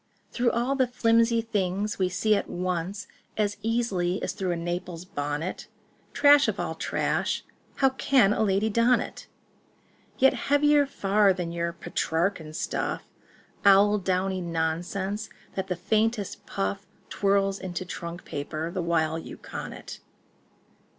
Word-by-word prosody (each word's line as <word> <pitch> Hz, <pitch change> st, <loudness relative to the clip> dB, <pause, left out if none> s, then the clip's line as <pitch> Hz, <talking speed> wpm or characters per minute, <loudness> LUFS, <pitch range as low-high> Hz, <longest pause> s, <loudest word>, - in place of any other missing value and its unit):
Through 240 Hz, -1 st, +2 dB
all 240 Hz, +4 st, 0 dB
the 260 Hz, -2 st, +2 dB
flimsy 230 Hz, -1 st, +3 dB
things 205 Hz, -2 st, -1 dB
we 185 Hz, -1 st, +2 dB
see 210 Hz, +4 st, +2 dB
at -, -, -2 dB
once 180 Hz, +2 st, -3 dB, 0.3 s
As 205 Hz, -1 st, 0 dB
easily 205 Hz, -5 st, 0 dB
as -, -, -2 dB
through 190 Hz, -2 st, -3 dB
a 175 Hz, -, +1 dB
Naples 175 Hz, 0 st, -4 dB
bonnet— 145 Hz, +1 st, -4 dB, 0.4 s
Trash 290 Hz, 0 st, +6 dB
of -, -, -1 dB
all -, -, -2 dB
trash!—how 270 Hz, -, -1 dB
can 260 Hz, -5 st, +3 dB
a -, -, -1 dB
lady 200 Hz, 0 st, +2 dB
don 230 Hz, +2 st, +4 dB
it? -, -, -7 dB, 0.9 s
Yet 265 Hz, +1 st, +5 dB, 0.2 s
heavier 290 Hz, 0 st, +4 dB
far 200 Hz, -5 st, +3 dB
than 175 Hz, -2 st, -4 dB
your 170 Hz, 0 st, -2 dB
Petrarchan 165 Hz, -1 st, -2 dB
stuff— -, -, -2 dB, 0.6 s
Owl 200 Hz, +1 st, +6 dB
downy 185 Hz, 0 st, 0 dB
nonsense 175 Hz, +5 st, -2 dB, 0.2 s
that 190 Hz, 0 st, -3 dB
the 180 Hz, -, -1 dB
faintest 215 Hz, +3 st, -1 dB
puff 200 Hz, 0 st, -3 dB, 0.2 s
Twirls 195 Hz, 0 st, +1 dB
into 185 Hz, -1 st, -4 dB
trunk 170 Hz, 0 st, -7 dB
paper 155 Hz, +3 st, -4 dB
the 185 Hz, 0 st, -2 dB
while 165 Hz, -1 st, +1 dB
you -, -, -9 dB
con -, -, -7 dB
it." -, -, -9 dB
195 Hz, 135 wpm, -27 LUFS, 175-220 Hz, 0.9 s, Trash